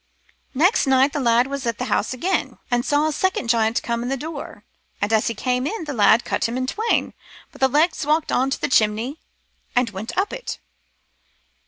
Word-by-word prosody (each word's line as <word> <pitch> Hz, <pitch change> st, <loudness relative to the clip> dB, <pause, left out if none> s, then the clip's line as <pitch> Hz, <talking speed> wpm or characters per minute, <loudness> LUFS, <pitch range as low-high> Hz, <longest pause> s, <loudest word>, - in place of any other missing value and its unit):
" -, -, -44 dB
Next 345 Hz, -, +3 dB
night 265 Hz, +2 st, +4 dB
t' 295 Hz, -, -1 dB
lad 240 Hz, -1 st, +3 dB
was 275 Hz, -2 st, -4 dB
at 230 Hz, -, -1 dB
the -, -, -3 dB
house -, -, 0 dB
again, 300 Hz, +10 st, -1 dB
and 240 Hz, 0 st, +2 dB
saw 290 Hz, +3 st, +2 dB
a 310 Hz, -, +1 dB
second 310 Hz, -6 st, -1 dB
giant 225 Hz, -1 st, +1 dB
come 235 Hz, 0 st, -2 dB
in 245 Hz, +2 st, -3 dB
at 270 Hz, -, 0 dB
door, 300 Hz, +1 st, -7 dB, 0.4 s
and 205 Hz, +2 st, -1 dB
as 220 Hz, -, +3 dB
he 230 Hz, -, -2 dB
came 250 Hz, +4 st, -1 dB
in, 340 Hz, -1 st, -4 dB
t' 295 Hz, -, -4 dB
lad 235 Hz, -1 st, +4 dB
cut -, -, -1 dB
him 240 Hz, -, -3 dB
in 255 Hz, -, -1 dB
twain; 440 Hz, -, 0 dB, 0.4 s
but -, -, -17 dB
the 265 Hz, -, +6 dB
legs 310 Hz, +5 st, +1 dB
walked 305 Hz, +2 st, +1 dB
on 260 Hz, +2 st, +2 dB
to 270 Hz, -, -2 dB
t' -, -, -1 dB
chimney 230 Hz, +5 st, +1 dB, 0.6 s
and 245 Hz, -3 st, +2 dB
went 205 Hz, +4 st, -7 dB
up 390 Hz, -, 0 dB
it. -, -, -5 dB
260 Hz, 215 wpm, -22 LUFS, 235-300 Hz, 0.6 s, the